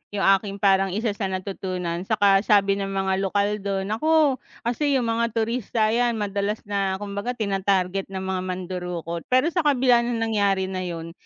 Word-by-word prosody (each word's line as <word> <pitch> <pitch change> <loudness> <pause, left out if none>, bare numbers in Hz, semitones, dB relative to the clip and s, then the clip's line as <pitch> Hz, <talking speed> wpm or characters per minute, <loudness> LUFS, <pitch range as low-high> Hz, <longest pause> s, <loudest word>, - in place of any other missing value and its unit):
yung 195 - -1
aking 200 0 -7
parang 195 -1 +3
isa 215 +2 -1
sa 195 -2 -2
natutunan 185 -2 -4
tsaka 200 -2 +4
sabi 200 -2 +4
ng 195 - -2
mga 190 -1 0
lokal 205 +2 0
dun, 195 0 -2
naku 305 +2 +3 0.3
kasi 280 +4 +1
yung 250 - 0
mga 230 0 0
turista 225 -1 0
yan 240 0 +1
madalas 205 +1 -2
na 195 -2 0
kumbaga 205 +4 -4
tinatarget 195 -3 0
ng 190 0 -4
mga 190 -1 -2
mandurukot 180 -2 -4
pero 255 +6 +4
sa 345 -2 0
kabila 250 -3 +4
nong 235 -1 -2
nangyari 200 -2 +2
na 185 -1 -3
yun 165 -1 -5
200 Hz, 170 wpm, -24 LUFS, 190-230 Hz, 0.3 s, tsaka